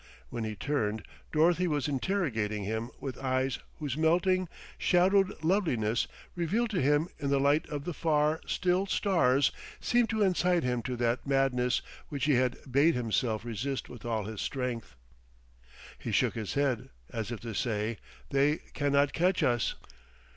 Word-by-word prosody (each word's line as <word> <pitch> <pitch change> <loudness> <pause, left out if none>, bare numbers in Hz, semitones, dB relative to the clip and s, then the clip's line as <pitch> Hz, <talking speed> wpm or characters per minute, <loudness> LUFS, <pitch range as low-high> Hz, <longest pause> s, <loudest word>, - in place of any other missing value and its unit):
When 115 - -3
he 110 -1 -4
turned, 110 -3 -1 0.3
Dorothy 170 +3 +3
was 150 -4 0
interrogating 130 - -1
him 110 +3 -2
with 135 -2 -5
eyes 130 0 0 0.2
whose 145 -4 -3
melting, 175 +3 +2 0.3
shadowed 185 -1 +3
loveliness, 135 - +1 0.3
revealed 210 +7 0
to 185 -5 0
him 145 +4 +3
in 140 - -1
the 140 0 +3
light 145 +3 +2
of 145 -2 -4
the 175 - -3
far, 155 -1 +1
still 185 +2 +1
stars, 145 -10 +3 0.3
seemed 240 -1 +2
to 220 -2 +1
incite 180 -2 +2
him 125 -1 0
to 125 +2 -3
that 120 +2 0
madness 135 -2 +2 0.3
which 140 -3 -2
he 150 - +4
had 125 -1 +2
bade 145 +6 +4
himself 115 -2 0
resist 125 +4 -3
with 120 - -10
all 115 -2 -1
his 110 -1 -5
strength. 125 - -3 1.0
He - - -4
shook - - +2
his 110 +1 -4
head, 140 -4 0 0.2
as 110 -1 -4
if 115 - -4
to 115 -1 -5
say: 110 0 -1 0.3
They 140 +2 +3 0.2
can 145 -1 0
not 140 0 +3
catch 180 0 +2
us. 120 -4 +1
140 Hz, 160 wpm, -30 LUFS, 120-165 Hz, 1.0 s, he